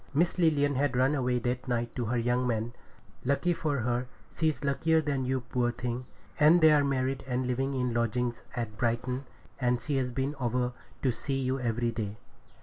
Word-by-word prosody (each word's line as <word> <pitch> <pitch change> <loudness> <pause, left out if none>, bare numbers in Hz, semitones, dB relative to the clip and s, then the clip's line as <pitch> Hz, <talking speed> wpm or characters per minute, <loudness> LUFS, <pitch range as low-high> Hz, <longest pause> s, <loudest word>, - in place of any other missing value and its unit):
Miss 170 +4 +2
Lilian 145 -4 +3
had 135 -1 +1
run 130 +3 +4
away 125 -3 +1
that 125 +2 -2
night 120 -1 -1
to 120 - -1
her 120 +3 0
young 120 +2 +1
man. 115 0 -1 0.5
Lucky 140 +7 +2
for 145 -5 -1
her! 120 +2 0 0.3
She's 155 -2 0
luckier 160 +4 +2
than 140 -4 -1
you, 130 0 0
poor 120 0 0
thing! 120 +1 -4 0.3
And 155 +4 +7
they're 155 -3 +6
married 135 -1 0
and 130 0 0
living 135 +2 -1
in 125 -2 0
lodgings 120 +1 0
at 115 -3 -4
Brighton, 125 +3 -1 0.3
and 125 -2 +2
she's 135 -3 -1
been 135 +3 -1
over 125 0 0 0.3
to 130 - +3
see 135 +3 -3
you 130 0 0
every 120 -1 0
day.' 110 -2 -4
125 Hz, 180 wpm, -29 LUFS, 120-140 Hz, 0.5 s, And